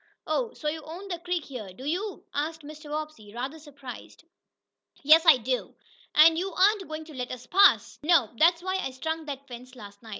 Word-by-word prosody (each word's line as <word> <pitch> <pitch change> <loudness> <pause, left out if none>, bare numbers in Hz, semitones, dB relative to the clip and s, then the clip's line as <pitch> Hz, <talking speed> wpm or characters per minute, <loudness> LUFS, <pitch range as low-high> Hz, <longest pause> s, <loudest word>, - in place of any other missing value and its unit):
"Oh, 480 -2 -1
so 305 - -5
you 315 +1 -2
own 345 +6 -9
the 350 -2 -4
creek 350 -2 -3
here, 220 -9 -8
do 255 +8 -11
you?" 375 +6 -3
asked 315 +2 -3
Mr. 300 +1 -11
Bobbsey, 300 -9 -6
rather 265 +6 -5
surprised. 280 -2 -11 0.8
"Yes, 315 +4 +7
I 310 -5 +9
do." 250 +1 -3 0.4
"And 320 +2 +7
you 385 +2 -3
aren't 395 0 +3
going 310 0 -6
to 310 - -12
let 250 -2 -5
us 250 -1 -8
pass?" 395 +8 +4
"Nope! 300 -7 +3
That's 335 +2 +4
why 375 0 -1
I 320 - -2
strung 320 +5 -4
that 280 -1 -7
fence 250 +1 -11
last 205 -4 -12
night. 225 - -13
305 Hz, 200 wpm, -27 LUFS, 260-335 Hz, 0.8 s, I